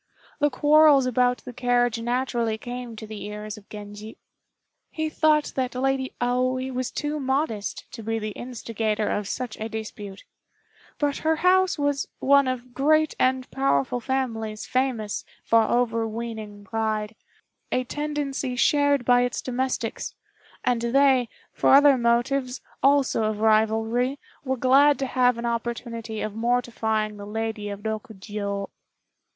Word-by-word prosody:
The 295 0 +3
quarrels 295 -1 +5
about 250 0 +1
the 250 - -7
carriage 245 -1 +1
naturally 240 -2 -1
came 245 0 -7
to 220 - -8
the 215 -1 -8
ears 210 0 -6
of 210 -1 -16
Genji. 210 +1 -9 0.7
He 315 -1 -2
thought 305 -1 +2
that 255 -1 -2
Lady 265 0 0
Aoi 255 +1 0
was 255 -1 -2
too 300 +1 -3
modest 265 -6 -2
to 230 - -8
be 225 +1 -2
the 215 -1 -4
instigator 220 -2 -3
of 205 -1 -2
such 245 +1 -4
a 220 +1 -4
dispute; 210 -3 -7 0.7
but 290 -1 0
her 320 0 +1
house 375 0 +4
was 285 -1 0
one 280 0 +4
of 250 -1 -4
great 310 +4 +3
and 255 0 +2
powerful 245 - +1
families 230 -4 -2
famous 255 -5 -1 0.2
for 230 0 +4
overweening 225 -3 -2
pride, 215 0 -2 0.6
a 255 - +1
tendency 285 -2 -3
shared 285 0 +3
by 245 0 +5
its 245 -1 -1
domestics; 260 +1 -3 0.5
and 245 -2 +1
they, 255 0 +3 0.2
for - - +5
other 285 0 +7
motives, 250 +2 +1 0.2
also 275 -5 +3
of 215 -1 -1
rivalry, 220 +4 +2 0.3
were 265 -1 -1
glad 275 +4 +5
to 270 - -2
have 250 -2 +2
an 235 - -4
opportunity 230 -1 -3
of 215 - -3
mortifying 225 -2 0
the 205 0 -8
Lady 220 -1 -3
of 200 0 -6
Rokjiô. 205 -2 -4
245 Hz, 140 wpm, -25 LUFS, 220-265 Hz, 0.7 s, other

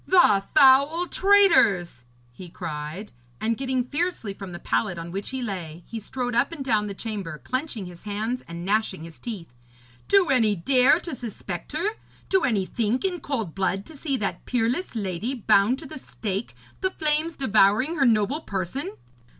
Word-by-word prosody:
'The 210 - +5
foul 280 +6 +6
traitors!' 335 - +4 0.3
he 175 +8 -11
cried, 165 +3 -6 0.3
and, 225 +1 0
getting 260 0 -1
fiercely 290 - -2
from 195 -2 -8
the 175 - -6
pallet 145 +3 -1
on 165 +1 -6
which 195 +2 -4
he 265 -1 -4
lay, 175 -6 -5
he 230 - -6
strode 245 +3 -4
up 245 +7 +2
and 295 -5 -6
down 215 -4 +2
the 200 - -5
chamber 200 -8 -5
clenching 255 - -3
his 175 -1 -11
hands 220 +5 -3
and 170 +1 -7
gnashing 200 -4 0
his 165 -1 -11
teeth. 195 - -7 0.5
'Do 390 -4 +4
any 225 -5 +3
dare 255 - +4
to 340 - -6
suspect 220 - -6
her 340 +7 0 0.4
do 380 -1 +3
any 205 -9 +1
think 230 - -1
in 360 -2 -1
cold 230 - -3
blood 195 0 -1
to 320 - -13
see 275 -1 -2
that 195 -5 -3
peerless 245 +7 -1
lady 205 +4 -2
bound 220 +1 +3
to - - -10
the 305 +1 -8
stake, 205 -4 -5 0.2
the 375 - +1
flames 315 -1 0
devouring 220 +5 +3
her 275 - +3
noble 230 +7 +2
person? 200 - -4
225 Hz, 175 wpm, -25 LUFS, 190-275 Hz, 0.5 s, foul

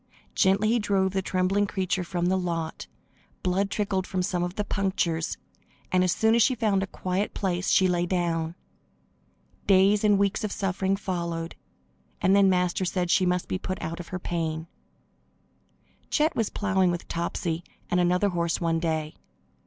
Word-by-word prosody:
Gently 195 +3 +3
he 235 +1 +3
drove 195 -3 +1
the 190 0 0
trembling 190 +2 +1
creature 185 -1 -1
from 175 0 -2
the 185 +1 +2
lot. 170 -3 -3 0.6
Blood 190 +2 +1
trickled 200 -3 -1
from 185 -1 -1
some 180 -1 -1
of 175 +1 -2
the 210 - -1
punctures, 190 -5 -1 0.5
and 185 0 +3
as 185 - +2
soon 220 +5 +3
as 235 - +4
she 255 +4 +4
found 210 -4 +1
a 195 - -2
quiet 185 +2 -2
place 185 -2 -1
she 190 - +5
lay 175 -1 +1
down. 170 -2 -1 1.1
Days 200 +2 +5
and 205 -1 +5
weeks 200 +1 +1
of 210 - -2
suffering 195 0 0
followed, 170 -4 -3 0.6
and 190 +1 +3
then 200 -1 +5
Master 180 0 +1
said 180 -1 -1
she 185 - +3
must 180 0 0
be 185 - -2
put 185 -1 -4
out 165 +2 -5
of 175 - -7
her 185 - -4
pain. 165 -3 -3 1.4
Chet 310 +1 +2
was 225 -3 0
plowing 190 -3 +1
with 175 0 -3
Topsy 170 0 -2 0.3
and 180 - +3
another 180 +3 +2
horse 170 -2 -1
one 165 -1 +1
day. 160 -2 -2
185 Hz, 170 wpm, -26 LUFS, 175-195 Hz, 1.4 s, she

